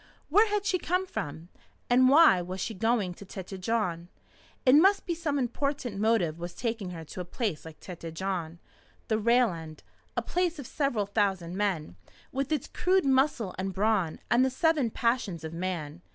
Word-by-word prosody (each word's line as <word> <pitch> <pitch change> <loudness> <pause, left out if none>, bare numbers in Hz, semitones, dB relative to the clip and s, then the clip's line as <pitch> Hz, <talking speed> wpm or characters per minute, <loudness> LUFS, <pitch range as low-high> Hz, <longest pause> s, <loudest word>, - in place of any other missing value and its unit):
Where 415 +8 +5
had 410 -1 -1
she 370 -2 +1
come 365 +3 0
from? 160 - -6 0.4
And 255 +1 +5
why 290 - +7
was 185 +2 -6
she 220 - -3
going 215 -2 0
to 190 - -12
Tête 190 0 -8
Jaune? 185 -5 -1 0.6
It 255 - +6
must 385 +7 +5
be 345 - -1
some 320 -4 -2
important 255 -3 -2
motive 205 -8 +1
was 175 +1 -6
taking 225 -5 -3
her 165 -2 -7
to 180 - -7
a - - -3
place 180 - -3
like 160 -1 -11
Tête 170 -3 -8
Jaune, 175 -3 -3 0.5
the 220 -1 +2
rail 235 +1 +4
end, 160 -2 -9 0.3
a - - +1
place 355 -2 0
of 285 - -7
several 245 -7 0
thousand 195 -4 0
men, 185 - -2 0.3
with 275 +2 -2
its 300 -5 0
crude 370 -1 +1
muscle 265 -6 +2
and 190 0 -3
brawn 195 -5 +1
and 240 +2 +5
the 265 - +3
seven 290 -1 +2
passions 230 -8 -1
of 160 0 -6
man. 170 -3 -4
215 Hz, 180 wpm, -28 LUFS, 180-270 Hz, 0.6 s, why